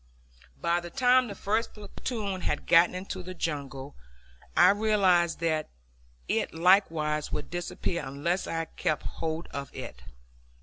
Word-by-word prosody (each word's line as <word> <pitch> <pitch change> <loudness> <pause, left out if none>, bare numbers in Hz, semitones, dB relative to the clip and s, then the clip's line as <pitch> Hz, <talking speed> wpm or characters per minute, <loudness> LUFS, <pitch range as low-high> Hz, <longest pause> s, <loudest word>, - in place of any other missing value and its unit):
By 170 +1 +1
the 175 0 -8
time 255 +2 +4
the 200 - -6
first 220 +4 -1
platoon 210 -2 -4
had 150 - -2
gotten 170 +2 +5
into 185 0 -5
the 185 +1 -8
jungle 140 -4 -4 0.6
I 180 +2 +8
realized 195 -5 +3
that 155 -2 0 0.6
it - - -1
likewise 160 -4 +3
would - - -4
disappear 175 -1 -3
unless 145 +7 -2
I 165 0 -2
kept 155 - -2
hold 160 +1 -4
of 140 -1 -5
it. - - -8
175 Hz, 135 wpm, -28 LUFS, 155-195 Hz, 0.6 s, I